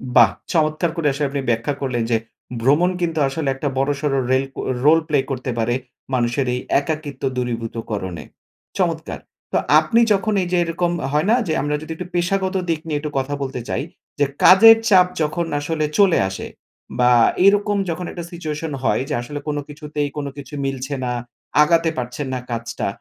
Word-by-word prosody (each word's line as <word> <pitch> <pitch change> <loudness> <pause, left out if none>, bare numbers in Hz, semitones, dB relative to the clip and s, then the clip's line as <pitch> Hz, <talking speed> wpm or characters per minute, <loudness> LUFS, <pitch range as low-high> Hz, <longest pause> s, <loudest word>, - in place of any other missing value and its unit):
বাহ! 115 -5 +7 0.2
চমৎকার 155 +1 +1
করে 165 -4 0
আসলে 140 +1 -1
আপনি 140 0 -2
ব্যাখ্যা 115 +5 0
করলেন, 125 -4 -1
যে 115 - +4 0.4
ভ্রমণ 145 +9 +4
কিন্তু 165 -2 0
আসলে 140 +2 -3
একটা 140 +2 -3
বড়সর 140 +2 0 0.2
রেল 130 +1 +3
ও - - -1 0.2
রোল 160 +2 +7
প্লে 150 -3 +2
করতে 130 0 -3
পারে 120 +1 +1 0.4
মানুষের 120 +2 +1
এই 125 - -1 0.2
একাকিত্ব 145 -2 -5
দূরীভূত 120 -2 -3 0.2
করনে। 95 -6 -4 0.5
চমৎকার! - - -1 0.3
তো - - +3 0.2
আপনি 195 +10 +2
যখন 210 +2 0
এই 180 - -2
যে 180 - +2
এরকম 170 +1 -1 0.2
হয় 150 +5 +1
না? - - +6
যে 160 - 0
আমরা 145 +1 -1
যদি 155 - -8
একটু 180 +2 -7
পেশাগত 190 +2 0
দিক 165 -2 +1
নিয়ে 150 -2 -1
একটু 150 0 -5
কথা 135 +2 -3
বলতে 130 -2 -4
চাই। - - -1 0.4
যে 145 - +4 0.2
কাজের 225 +4 +9
চাপ 185 -3 +6
যখন 155 +3 0
আসলে 155 +1 -1
চলে 195 -4 +5
আসে 95 - -6 0.5
বা 125 0 +5 0.3
এরকম 205 +1 +4
যখন 170 +2 -3
একটা 175 - -6
সিচুয়েশন 160 -2 -4
হয় 130 - +2
যে - - -1
আসলে 145 +4 -6
কোনো 150 -1 -1
কিছুতেই 150 -1 -4
কোনো 145 -1 -3
কিছু 140 0 -10
মিলছে 135 0 -3
না, 125 - -1 0.5
আগাতে 165 +1 +3
পারছেন 125 +3 -4
না 130 - -1
কাজটা, 115 0 -3
150 Hz, 180 wpm, -21 LUFS, 130-165 Hz, 0.5 s, কাজের